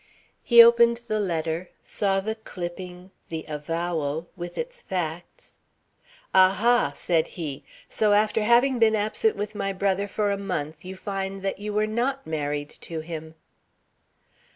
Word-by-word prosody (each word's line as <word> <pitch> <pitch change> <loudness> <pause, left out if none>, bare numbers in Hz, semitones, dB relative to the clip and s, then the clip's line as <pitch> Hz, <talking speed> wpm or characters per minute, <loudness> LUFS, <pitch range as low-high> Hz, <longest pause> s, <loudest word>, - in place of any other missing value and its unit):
He 235 -1 +9
opened 235 0 +5
the 215 0 0
letter, 170 -2 -2
saw 195 -2 0
the 220 +3 -2
clipping, 180 -3 -8 0.2
the 160 -1 -5
avowal, 160 0 -3
with 175 -1 -7
its 485 0 -5
facts. 175 -2 -5 0.8
"A 185 0 +7
ha!" 235 +5 +2
said 165 -2 +1
he. 150 -6 -5 0.2
"So 210 -1 +2
after 215 +1 +3
having 240 +4 +4
been 220 -1 +5
absent 215 - +1
with 210 +1 -4
my 195 -2 -2
brother 195 +1 0
for 205 0 0
a 200 - -2
month, 155 -5 -4
you 185 +1 -7
find 195 0 -4
that 195 0 -2
you 210 +1 -4
were 210 +1 +1
not 245 +5 -1
married 145 -1 -3
to 165 -2 -5
him." 160 0 -7
195 Hz, 150 wpm, -25 LUFS, 165-215 Hz, 0.8 s, He